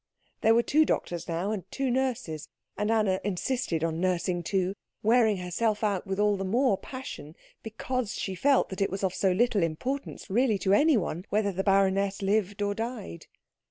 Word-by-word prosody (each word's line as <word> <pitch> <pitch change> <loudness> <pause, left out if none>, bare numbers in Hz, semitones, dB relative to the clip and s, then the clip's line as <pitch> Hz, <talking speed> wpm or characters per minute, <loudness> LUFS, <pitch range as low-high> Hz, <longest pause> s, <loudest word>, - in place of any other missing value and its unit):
There 225 0 +5
were 235 - +4
two 310 +5 +4
doctors, 175 - -2
now, 175 +4 -2
and 195 -3 -5
two 270 -2 -1
nurses; 240 - -2 0.3
and 210 0 -1
Anna 210 -4 +2
insisted 195 -3 -1
on 165 0 -1
nursing 180 -1 0
too, 185 +2 0 0.3
wearing 220 -2 +4
herself 205 +5 -1
out 200 -2 0
with 190 +1 -2
all 210 -1 +3
the 195 - -3
more 230 +3 +2
passion 190 - -8 0.3
because 230 +1 -3
she 190 - -3
felt 270 +9 +2
that 190 0 -5
it 195 - +2
was 195 +1 -5
of 185 -2 +1
so 190 0 +1
little 215 +2 +2
importance 245 - -3
really 225 +1 +2
to 190 +1 +1
anyone 205 - +2
whether 205 -1 +1
the 190 +1 -2
baroness 195 0 +2
lived 205 0 0
or 205 0 0
died. 225 - -6
200 Hz, 180 wpm, -28 LUFS, 185-230 Hz, 0.3 s, There